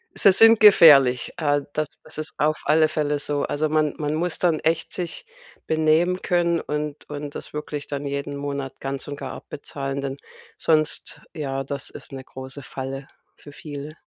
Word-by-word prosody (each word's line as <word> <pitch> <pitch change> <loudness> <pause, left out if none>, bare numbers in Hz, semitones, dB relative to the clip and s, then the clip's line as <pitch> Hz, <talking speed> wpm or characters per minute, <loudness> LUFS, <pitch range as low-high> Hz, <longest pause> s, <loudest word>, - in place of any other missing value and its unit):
Sie 195 - +7
sind 225 +3 +7
gefährlich. 145 - +7
Äh, 145 -3 +1
das 155 -1 -3
das - - -9
ist 155 0 -5
auf 155 +1 +1
alle 155 +1 +4
Fälle 150 -1 -1
so. 145 0 -1
Also, 155 +1 -1
man 155 -1 +1
man 150 0 -1
muss 170 +1 -2
dann 170 -4 +2
echt 165 +1 0
sich 180 - -4 0.4
benehmen 160 +4 +2
können, 170 -1 +2
und 150 0 -4
und 145 0 -6
das - - -8
wirklich 150 -1 -5
dann 145 0 -4
jeden 140 0 -3
Monat 140 -1 -5
ganz 135 0 -5
und 145 0 -5
gar - - -6
abbezahlen, 140 -1 -6
denn 135 0 -4 0.4
sonst, 155 -1 +1
ja, 135 -3 -3
das 140 0 -4
ist - - -8
'ne 135 -1 -7
große 130 +2 -9
Falle, 135 +1 -6 0.3
für 145 - -13
viele. 145 +1 -8
150 Hz, 175 wpm, -23 LUFS, 140-155 Hz, 0.4 s, Sie